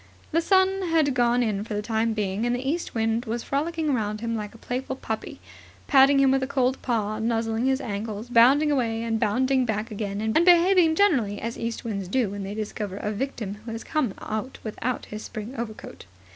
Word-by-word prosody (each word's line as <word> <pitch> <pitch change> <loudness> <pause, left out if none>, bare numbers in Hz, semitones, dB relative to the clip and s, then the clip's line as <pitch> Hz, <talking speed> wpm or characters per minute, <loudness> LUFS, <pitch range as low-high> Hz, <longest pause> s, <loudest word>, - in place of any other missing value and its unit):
The 330 +1 +2
sun 380 +2 +3
had 315 -4 +3
gone 245 0 +2
in 210 -3 -1
for 215 -1 -5
the 210 - -2
time 225 +1 0
being, 205 0 -2
and 240 0 +1
the 255 +2 -4
east 335 0 -2
wind 225 +1 0
was 230 +1 -3
frolicking 310 +1 -1
round 215 -3 -1
him 230 0 -2
like 210 0 -5
a - - -11
playful 255 +3 -4
puppy, 220 -4 -5 0.5
patting 275 0 +6
him 270 -1 +5
with 270 0 +2
a 260 - -1
cold 260 -1 0
paw, 215 -3 -1
nuzzling 225 +1 0
his 265 0 +2
ankles, 215 -1 -5
bounding 260 +6 +5
away 230 -5 0
and 225 -1 -1
bounding 260 +5 +2
back 220 0 -2
again, 205 -1 -3
and 220 +1 -1
behaving 350 -1 +5
generally 260 - +2
as 230 +1 -4
east 230 0 -4
winds 200 -4 -3
do 220 +1 0
when 200 0 -5
they 195 +1 -5
discover 210 -2 -4
a 210 - -3
victim 215 -3 -4
who 225 - -7
has 225 - -6
come 280 -11 -1
out 220 +5 -4
without 235 +3 -3
his 215 0 -7
spring 220 +2 -7
overcoat. 230 -3 -7
230 Hz, 205 wpm, -25 LUFS, 215-265 Hz, 0.5 s, patting